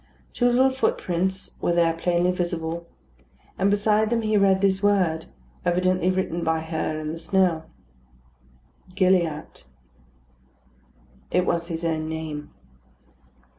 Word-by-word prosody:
Two 245 Hz, -, +2 dB
little 255 Hz, +2 st, +4 dB
footprints 190 Hz, -7 st, -1 dB
were 175 Hz, -, +1 dB
there 170 Hz, -1 st, +3 dB
plainly 175 Hz, +2 st, +1 dB
visible; 170 Hz, -2 st, -3 dB, 0.7 s
and 195 Hz, +1 st, +3 dB
beside 210 Hz, +1 st, +2 dB
them 230 Hz, -1 st, 0 dB
he 215 Hz, 0 st, +1 dB
read 195 Hz, -2 st, +4 dB
this 190 Hz, -1 st, +2 dB
word, 185 Hz, -6 st, +1 dB, 0.4 s
evidently 185 Hz, +1 st, +1 dB
written 185 Hz, -2 st, -1 dB
by 160 Hz, 0 st, +1 dB
her 160 Hz, -1 st, -3 dB
in 155 Hz, 0 st, -4 dB
the 165 Hz, -, -6 dB
snow 175 Hz, -3 st, +1 dB, 1.3 s
"GILLIATT." 175 Hz, -, 0 dB, 1.6 s
It 180 Hz, 0 st, +1 dB
was 170 Hz, -2 st, 0 dB
his 165 Hz, -1 st, -4 dB
own 160 Hz, -1 st, -1 dB
name. 155 Hz, -2 st, -5 dB
175 Hz, 120 wpm, -24 LUFS, 165-190 Hz, 1.6 s, little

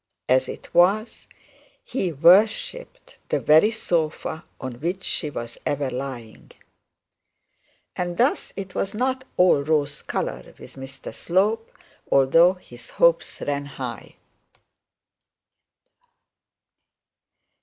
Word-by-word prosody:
As 130 Hz, 0 st, +3 dB
it -, -, -9 dB
was, 195 Hz, +6 st, +2 dB, 0.6 s
he 195 Hz, -, -2 dB
worshipped 210 Hz, -, +2 dB
the -, -, +1 dB
very 155 Hz, +8 st, +5 dB
sofa 160 Hz, -6 st, -2 dB
on 125 Hz, -2 st, -7 dB
which 180 Hz, +4 st, -2 dB
she 155 Hz, -, -2 dB
was 120 Hz, -4 st, -7 dB
ever 140 Hz, -2 st, -1 dB
lying. 125 Hz, -4 st, -7 dB, 1.5 s
And 175 Hz, -1 st, -3 dB
thus 255 Hz, +5 st, +1 dB
it 190 Hz, -2 st, -7 dB
was 195 Hz, -, -2 dB
not 260 Hz, +2 st, -1 dB
all 180 Hz, -5 st, +5 dB
rose 145 Hz, -1 st, 0 dB
colour -, -, -4 dB
with -, -, -12 dB
Mr 135 Hz, 0 st, -9 dB
Slope, 210 Hz, +6 st, 0 dB, 0.4 s
although 165 Hz, +7 st, +5 dB
his 185 Hz, -, -12 dB
hopes -, -, +2 dB
ran 145 Hz, 0 st, -2 dB
high. -, -, -7 dB
170 Hz, 100 wpm, -23 LUFS, 140-205 Hz, 1.5 s, very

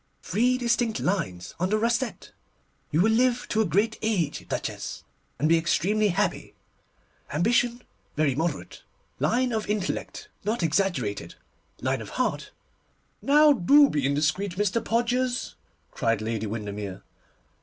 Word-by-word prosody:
Three 250 Hz, +4 st, +2 dB
distinct 235 Hz, -2 st, 0 dB
lines 150 Hz, -, -2 dB
on 185 Hz, +2 st, 0 dB
the 215 Hz, -, +2 dB
rascette! 235 Hz, +3 st, -1 dB, 0.6 s
You 155 Hz, -, +2 dB
will 220 Hz, +4 st, +4 dB
live 245 Hz, +2 st, +2 dB
to 220 Hz, -, +2 dB
a -, -, +2 dB
great 205 Hz, +7 st, +1 dB
age, 190 Hz, -9 st, -1 dB
Duchess, -, -, -4 dB, 0.3 s
and 155 Hz, -, +1 dB
be 165 Hz, +1 st, +4 dB
extremely 200 Hz, +6 st, +1 dB
happy. 175 Hz, -, -1 dB, 0.8 s
Ambition—very 210 Hz, -, 0 dB
moderate, 155 Hz, +1 st, -3 dB, 0.4 s
line 250 Hz, +1 st, +1 dB
of 220 Hz, -2 st, -2 dB
intellect 210 Hz, -3 st, -3 dB, 0.2 s
not 215 Hz, -1 st, -1 dB
exaggerated, 150 Hz, -, -1 dB, 0.5 s
line 130 Hz, -1 st, -1 dB
of 110 Hz, -, -8 dB
heart—' 255 Hz, -, -1 dB, 0.7 s
'Now, 295 Hz, +1 st, +6 dB
do 280 Hz, +6 st, +5 dB
be 145 Hz, -, 0 dB
indiscreet, 155 Hz, +7 st, 0 dB
Mr. 205 Hz, +3 st, 0 dB
Podgers,' 245 Hz, +2 st, 0 dB, 0.4 s
cried 115 Hz, -2 st, 0 dB
Lady 110 Hz, 0 st, -3 dB
Windermere. 105 Hz, -2 st, -5 dB
200 Hz, 125 wpm, -26 LUFS, 145-235 Hz, 0.8 s, Now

